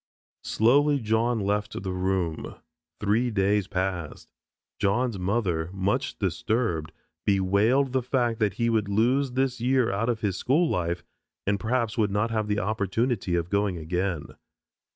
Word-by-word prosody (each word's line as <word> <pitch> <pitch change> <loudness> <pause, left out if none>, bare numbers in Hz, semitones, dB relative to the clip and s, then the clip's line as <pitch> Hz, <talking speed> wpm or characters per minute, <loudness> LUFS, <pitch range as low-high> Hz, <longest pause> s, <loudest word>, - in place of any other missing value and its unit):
Slowly 140 +6 +3
John 115 +1 +1
left 105 0 -2
the 95 - -2
room. 90 -3 -2 0.4
Three 110 +4 +1
days 100 -2 +1
passed. 90 -4 -4 0.5
John's 105 +1 +1
mother, 90 -4 0
much 100 +8 -1
disturbed, 95 -4 -1 0.3
bewailed 100 +8 +2
the 130 - +2
fact 120 -2 0
that 105 -3 +1
he 115 +1 0
would 110 -3 +1
lose 125 +6 +2
this 130 -2 0
year 125 -1 +2
out 105 +5 0
of 115 -2 -1
his 100 -4 0
school 155 +7 +2
life 85 - -1 0.4
and, 100 0 +1
perhaps, 115 0 -1
would 105 -1 +3
not 105 +3 0
have 110 -2 -1
the 105 -1 0
opportunity 105 0 0
of 85 0 -2
going 100 -2 +1
again. 85 0 -2
105 Hz, 145 wpm, -26 LUFS, 95-120 Hz, 0.5 s, Slowly